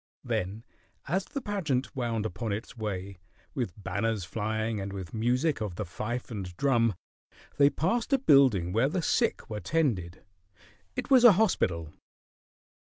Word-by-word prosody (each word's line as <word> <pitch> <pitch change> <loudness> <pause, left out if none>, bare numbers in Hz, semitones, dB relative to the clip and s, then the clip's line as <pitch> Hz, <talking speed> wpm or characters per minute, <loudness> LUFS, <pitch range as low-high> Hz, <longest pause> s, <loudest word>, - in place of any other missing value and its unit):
Then 100 +5 -2 0.4
as 185 +5 0
the 280 -1 -5
pageant 165 - -2
wound 115 -4 -1
upon 110 0 -3
its 110 +4 -5
way, 100 -4 -5 0.3
with 125 - -2
banners 105 +2 -1
flying 110 +2 -2
and 100 0 -4
with 95 -3 -7
music 125 +5 +1
of 105 -5 -3
the 105 - -3
fife 120 +8 -5
and 95 -5 -6
drum, 115 -6 +2 0.6
they 140 0 +6
passed 190 - -1
a 275 - +5
building 130 - +4
where 115 +6 +3
the 175 +1 -2
sick 235 +6 +1
were 105 -1 -4
tended. 105 - -1 0.7
It 250 +2 -4
was 255 -2 +7
a 240 -4 +10
hospital. 90 - +1
115 Hz, 150 wpm, -29 LUFS, 100-150 Hz, 0.7 s, a